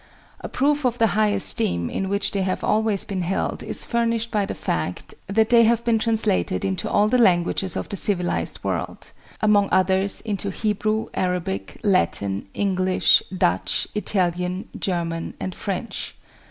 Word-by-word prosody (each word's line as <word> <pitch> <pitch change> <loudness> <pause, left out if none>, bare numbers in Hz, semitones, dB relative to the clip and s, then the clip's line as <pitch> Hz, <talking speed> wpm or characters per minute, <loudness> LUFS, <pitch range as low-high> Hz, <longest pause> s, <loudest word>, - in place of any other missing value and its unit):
A - - -7
proof 290 +2 +1
of 245 -2 0
the 230 - +4
high 215 +1 +3
esteem 90 - +3
in 190 - -3
which 200 0 0
they 200 - -1
have 185 -1 -2
always 215 -2 +1
been 190 -2 -3
held 180 +2 -2
is - - -2
furnished 230 -1 0
by 205 -2 0
the - - -4
fact 85 +2 -3
that 220 +3 +2
they 235 -1 +7
have 235 +1 +2
been 230 -2 +2
translated 155 - 0
into 95 -1 -2
all 205 +1 +3
the 250 +3 +2
languages 185 -3 +2
of - - -3
the - - -4
civilized 180 -2 -1
world; - - -4 0.3
among 205 -2 +3
others, 190 +1 +2
into 205 -2 -2
Hebrew, 215 +2 -1
Arabic, 175 - -3
Latin, 100 - +1
English, 185 -2 +3
Dutch, 95 - 0
Italian, 180 -3 -1
German, 170 -3 -3
and 185 - -4
French. 200 +4 -5
195 Hz, 155 wpm, -23 LUFS, 180-215 Hz, 0.3 s, they